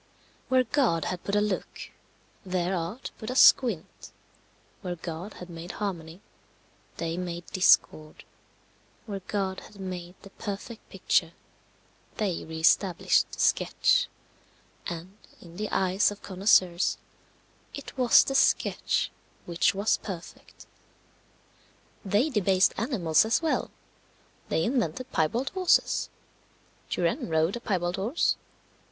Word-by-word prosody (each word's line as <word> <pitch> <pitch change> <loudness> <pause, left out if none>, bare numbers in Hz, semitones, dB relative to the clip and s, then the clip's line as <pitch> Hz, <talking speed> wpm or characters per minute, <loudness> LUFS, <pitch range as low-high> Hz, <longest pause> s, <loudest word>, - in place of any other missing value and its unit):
Where 260 0 +4
God 230 - +1
had 180 -1 -4
put 200 - -2
a 205 - +3
look, 210 -2 -4 0.5
their 180 -1 -1
art 180 +9 -5
put 220 - -6
a 255 - -3
squint; 230 -10 +4 0.7
where 180 -2 -4
God 170 +4 -7
had 180 - -9
made 170 0 -8
harmony, 175 -3 -5 0.8
they 165 0 -3
made 175 -1 -5
discord; 155 -4 +2 0.8
where 200 -3 -5
God 190 0 -3
had 205 - -15
made 180 -1 -6
the 195 - -13
perfect 210 +3 -7
picture, - - 0 0.8
they 195 -5 -1
re 160 0 -7
established 180 +2 +3
the - - -10
sketch; - - +2 0.8
and, 175 +5 -7 0.2
in 170 -1 -14
the 215 +1 -3
eyes 190 +1 +2
of 205 0 -10
connoisseurs, 185 -2 +2 0.8
it 285 - -9
was 250 -2 +6
the 270 - -3
sketch 270 0 +1 0.3
which 170 +2 +1
was 200 +3 +2
perfect. 180 -4 -10 1.4
They 210 +9 +1
debased 190 -5 +3
animals 195 - +2
as 225 +8 +1
well; 320 - 0 0.8
they 160 - +1
invented 255 +2 -1
piebald 230 - 0
horses. 370 -2 +2 0.8
Turenne 170 -1 -1
rode 160 +4 +1
a - - -4
piebald 180 -6 -1
horse. 225 - +1
190 Hz, 120 wpm, -27 LUFS, 175-220 Hz, 1.4 s, was